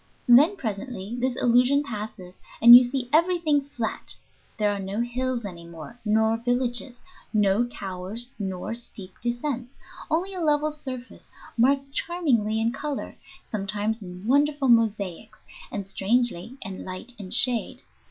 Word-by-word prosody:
Then 285 +11 +7
presently 220 - -5
this 255 0 0
illusion 250 +3 +3
passes, 210 -7 -7 0.2
and 235 +1 +11
you 250 - +10
see 250 0 -2
everything 330 -3 +3
flat. 245 -5 -2 0.4
There 210 -2 +2
are 200 - -3
no 195 +3 -3
hills 245 0 -2
any 175 -4 -7
more, 170 +8 -11
nor 220 +1 +2
villages; 245 +1 -1 0.3
no 210 +2 +2
towers 200 +2 -6
nor 190 +1 -4
steep 210 -5 -10
descents, 240 +1 -3 0.3
only 350 +5 0
a 365 - -5
level 305 -1 +2
surface, 260 -4 -8 0.3
marked 275 +3 +2
charmingly 255 -12 0
in 225 +1 +1
color, 285 +2 -5 0.3
sometimes 210 +1 -2
in 180 0 -9
wonderful 285 +2 +2
mosaics, 215 -2 +1 0.3
and 200 -2 -4
strangely 220 +2 0
in 190 -1 -7
light 185 +7 -6
and 185 -2 -8
shade. 245 -2 +2
235 Hz, 135 wpm, -25 LUFS, 205-265 Hz, 0.4 s, and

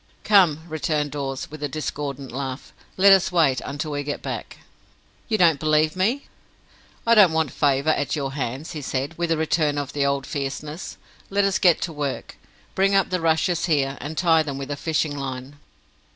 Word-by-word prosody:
"Come," 180 -7 +4
returned 155 -2 -1
Dawes, 135 -1 -4
with 155 -1 -9
a 145 - -1
discordant 140 -2 -5
laugh. 130 +1 -5 0.2
"Let 195 +1 +7
us 190 -1 +3
wait 150 -8 +3
until 150 +2 -4
we 145 0 -2
get 145 0 -5
back." - - -5 0.7
"You 220 - +2
don't 165 -6 +4
believe 155 +1 +2
me?" 225 +10 0 0.8
"I 230 - +5
don't 200 -7 +7
want 160 -4 0
favour 140 +1 +2
at 145 - -1
your 140 -3 -3
hands," 135 +3 -4
he 155 - -6
said, 135 +3 -3
with 170 -1 0
a 165 - +2
return 155 -2 +1
of 145 -1 -3
the 145 - 0
old 140 -1 0
fierceness. 150 +4 -5 0.3
"Let 200 0 +2
us 195 -1 +1
get 175 -4 +4
to 170 - -3
work. 145 -2 -4 0.4
Bring 195 +1 +2
up 195 -1 +2
the 180 -2 0
rushes 165 +1 +1
here, 140 -5 0
and 150 +2 -6
tie 165 -2 +4
them 140 -3 -4
with 140 +1 -6
a - - -1
fishing 155 0 -1
line." 135 0 -6
150 Hz, 190 wpm, -23 LUFS, 140-165 Hz, 0.8 s, Let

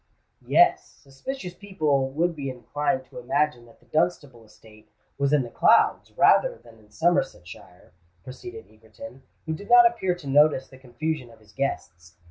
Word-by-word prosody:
"Yes—suspicious 180 - 0
people 155 -9 -1
would 165 +5 -1
be 140 -2 -5
inclined 145 +6 -3
to - - -11
imagine 150 - -1
that 115 - -21
the - - -27
Dunstable 135 -3 -2
estate 110 0 -20 0.3
was 140 0 +1
in 150 -3 +3
the 120 - -9
clouds - - +3
rather - - +4
than 115 -1 -19
in 105 -1 -23
Somersetshire," 110 - -3 0.3
proceeded 365 - -10
Egerton, 280 - -14 0.2
who 160 - -3
did 200 +6 -9
not 240 0 +8
appear 190 -6 +1
to 175 -4 -14
notice 145 -1 +3
the 130 - -16
confusion 130 +1 -4
of 115 - -17
his 105 -1 -22
guests. 90 -9 -5
140 Hz, 155 wpm, -25 LUFS, 120-175 Hz, 0.3 s, not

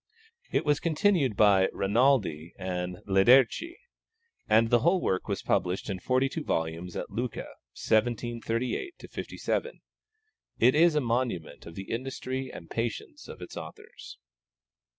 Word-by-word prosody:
It - - 0
was 145 -1 +2
continued 160 - +2
by 100 -3 +5
Rainaldi 100 - +1
and 90 -1 -4
Laderchi, 125 - +4 0.7
and 115 +1 +4
the 120 - +5
whole 175 +9 +3
work 95 - -1
was - - -3
published 90 +3 0
in 95 - -4
forty 130 +7 +1
two 155 +3 -5
volumes 80 - -3
at - - -5
Lucca 120 0 -3 0.4
1738 120 - -1 0.2
57. 475 +2 -3 0.8
It 125 +3 +5
is 165 +1 +4
a 150 - +3
monument 115 - -2
of 85 - -10
the 95 0 -7
industry 130 +1 -4
and - - -10
patience 115 -1 -4
of - - -9
its - - -10
authors. 80 0 -10
115 Hz, 130 wpm, -28 LUFS, 95-135 Hz, 0.8 s, by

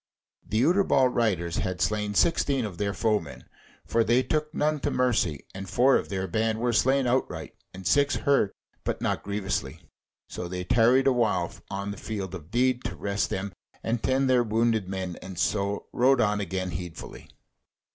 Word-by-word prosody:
The 110 +3 0
Utterbol 170 -8 +4
Riders 90 -8 0
had 90 0 -2
slain 105 -1 0
sixteen 140 -5 +2
of 95 -5 -7
their 100 -1 0
foemen; 105 +2 -1 0.4
for 115 - +2
they 120 +3 +3
took 155 +1 -1
none 150 -1 0
to - - -1
mercy, 115 - 0
and 95 0 -7
four 130 +3 +4
of - - 0
their 95 -1 -2
band 110 +4 0
were 120 +1 0
slain 135 +4 +3
outright, 125 +2 -1 0.2
and 95 0 -10
six 145 +7 +3
hurt, 140 -8 +2 0.3
but - - -2
not - - -1
grievously. 95 -8 -3 0.5
So 90 - -6
they 90 +1 -4
tarried 120 +7 +4
awhile 110 -10 +2 0.2
on 100 +1 -4
the 100 - -7
field 95 -3 -5
of 80 -4 -8
deed 125 +2 +1
to - - -3
rest 100 0 -1
them 95 +1 -3 0.3
and 115 0 -1
tend 135 +1 +1
their 130 -1 +4
wounded 110 -3 +1
men, 95 -3 -4
and 95 -1 -9
so 100 +2 0
rode 130 +1 +4
on 105 -2 +2
again 95 -1 -3
heedfully. 85 0 -7
105 Hz, 175 wpm, -27 LUFS, 95-125 Hz, 0.5 s, Utterbol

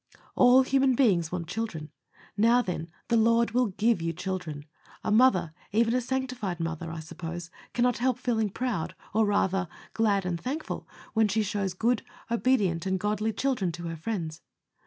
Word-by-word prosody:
All 255 +1 +6
human 265 0 +3
beings 185 - +3
want 180 -2 -3
children. 180 -7 -4 0.4
Now, 235 +4 +4
then, 170 -4 -4 0.2
the 235 - +4
Lord 230 +1 +3
will 250 0 +2
give 215 0 +1
you 165 0 -1
children. 175 -5 -4 0.4
A - - -1
mother 210 -9 +4 0.2
even 230 +3 +3
a 250 - +2
sanctified 250 -7 -3
mother 165 0 -3
I 165 - -5
suppose, 165 +2 -7 0.2
cannot 245 -1 +2
help 250 0 +1
feeling 230 -4 0
proud, 220 -5 -3 0.2
or, 220 0 +3
rather, 195 -2 +1 0.3
glad 205 -4 +2
and 175 -2 -2
thankful, 290 +5 -4 0.3
when 220 -1 +4
she 215 +2 +1
shows 195 -2 -2
good, 230 +4 +1 0.3
obedient, 205 -8 +2
and 190 0 0
godly 210 +2 0
children 215 -4 0
to 170 +1 -7
her 165 - -4
friends. 165 -3 -4
210 Hz, 165 wpm, -28 LUFS, 175-240 Hz, 0.4 s, All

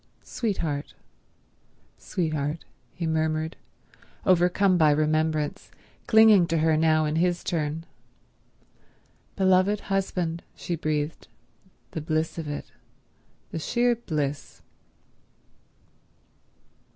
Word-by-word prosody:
"Sweetheart—sweetheart," 155 - -5 0.3
he 170 - -5
murmured, 160 0 -1 0.7
overcome 185 +1 +4
by 160 -3 +5
remembrance, 155 0 0 0.4
clinging 220 -5 +6
to 165 - 0
her 160 0 +3
now 155 0 +3
in 150 +1 -1
his 175 +1 +1
turn. 160 -1 -2 1.5
"Beloved 190 +1 +3
husband," 180 -4 -1
she 175 - -3
breathed—the 155 +3 -6
bliss 155 +2 -1
of 160 - -5
it—the 145 +2 -10
sheer 240 +8 +1
bliss 150 - -4
160 Hz, 80 wpm, -26 LUFS, 155-185 Hz, 1.5 s, clinging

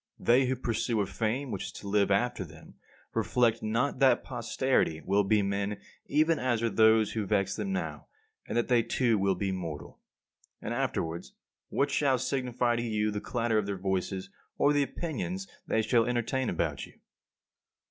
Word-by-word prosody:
They 125 +3 +4
who 130 - +1
pursue 115 -2 -1
a - - 0
fame 120 +7 -2
which 95 - -3
is - - -6
to 100 - -9
live 100 0 +2
after 100 0 +1
them 80 -2 -13 0.4
reflect 120 -2 +2
not 115 +6 0
that 130 -3 +4
posterity 125 - 0
will 100 +4 +2
be 105 +1 +3
men 100 +1 -2 0.3
even 155 +2 +2
as 120 -3 0
are 115 - +1
those 110 -1 +4
who 110 - -2
vex 100 -2 +1
them 195 - -3
now, 195 - -4 0.4
and - - -2
that 120 - +1
they 120 -2 +4
too 115 -2 +1
will 95 0 +2
be 95 +1 -1
mortal. 85 -5 -6 0.6
And - - -4
afterwards, 85 +2 -2 0.4
what 140 +1 +1
shall 140 -2 +2
signify 125 -2 0
to - - -1
you 110 -2 0
the 105 0 -3
clatter 115 -2 0
of 100 - -3
their 100 -1 -2
voices, 95 0 -2 0.3
or 145 - +4
the 145 - +3
opinions 175 +7 -3 0.2
they 110 - +1
shall 115 +1 +3
entertain 125 +1 0
about 80 -5 -2
you? - - -18
115 Hz, 180 wpm, -29 LUFS, 100-125 Hz, 0.6 s, They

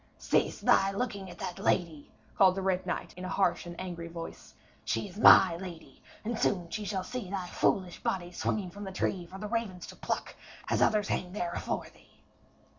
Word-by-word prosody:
'Cease - - +1
thy 195 - +5
looking 200 -2 -3
at 175 - -10
that 180 - -5
lady,' 165 -5 0 0.3
called 185 -2 +6
the 195 - -2
Red 185 -1 0
Knight - - -3
in 180 - -8
a 185 - -3
harsh 180 -3 +1
and 170 0 -8
angry 175 -2 -5
voice. 165 0 -8 0.3
'She - - -1
is 190 +3 -10
my 190 -5 +9
lady, 175 -3 -9 0.2
and 230 0 -2
soon 180 -4 +1
shall 200 -3 -2
she - - -11
see 190 - -8
thy 190 -2 -3
foolish 180 0 0
body 175 -2 -1
swinging 185 +1 -2
from 205 +3 -8
the 190 - -5
tree 185 -1 -1
for 190 - -9
the 210 +2 -5
ravens 205 -6 -2
to - - -10
pluck, - - -3 0.4
as - - +2
others 210 -1 +3
hang 180 0 -2
there 175 -4 -2
afore - - -2
thee.' - - -22
185 Hz, 200 wpm, -30 LUFS, 175-200 Hz, 0.4 s, my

